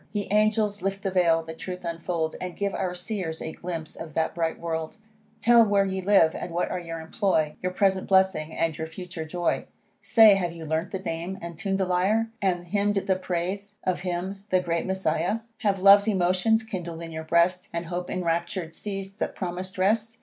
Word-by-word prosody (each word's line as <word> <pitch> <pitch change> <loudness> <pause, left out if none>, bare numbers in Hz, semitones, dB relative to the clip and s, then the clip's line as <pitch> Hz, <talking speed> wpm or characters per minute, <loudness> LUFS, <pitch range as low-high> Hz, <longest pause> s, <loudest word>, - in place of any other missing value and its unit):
Ye 205 -2 -2
angels, 210 -1 +2
lift 195 0 -2
the 195 - -1
vail, 170 -3 +3
the 160 0 -7
truth 180 +2 -7
unfold, 165 -1 -2
And 180 -1 -5
give 200 -1 -1
our 180 -1 -2
Seers 180 -3 -4
a 160 - -5
glimpse 165 -2 -6
of 160 -3 -9
that 160 0 +1
bright 165 -1 -1
world; 160 0 -4 0.4
Tell 235 0 +6
where 200 -2 +3
ye 190 0 -2
live, 185 -4 +5
and 170 - -6
what 175 - 0
are 180 - -2
your 165 -1 -6
employ, 160 -2 0
Your 185 - -1
present 190 0 +1
blessing, 190 -5 +3
and 165 -1 0
your 160 +1 -4
future 170 -1 -7
joy. 175 +2 -1 0.4
Say, 220 -3 +7
have 175 -3 0
you 165 -1 -8
learn'd 160 +3 -1
the - - -3
name, 180 0 -4
and 170 -1 -7
tun'd 195 +3 -1
the 190 - +2
lyre, 200 +5 +1
And 180 -3 0
hymn'd 205 +3 +1
the 195 -1 +1
praise 185 +3 -3
of 185 -1 0
him 185 +2 -4
the 185 - +4
great 170 -1 -1
Messiah? 190 +2 0 0.2
Have 200 -2 +1
love's 200 +2 +7
emotions 195 +3 +2
kindl'd 175 -6 -5
in 165 - -7
your 160 0 -5
breast, 170 +3 +2
And 170 0 -3
hope 175 +1 -4
enraptur'd 170 -1 -2
seiz'd 195 +1 -5
the - - +1
promis'd 185 0 -5
rest? 220 +4 +1
180 Hz, 200 wpm, -26 LUFS, 170-195 Hz, 0.4 s, Say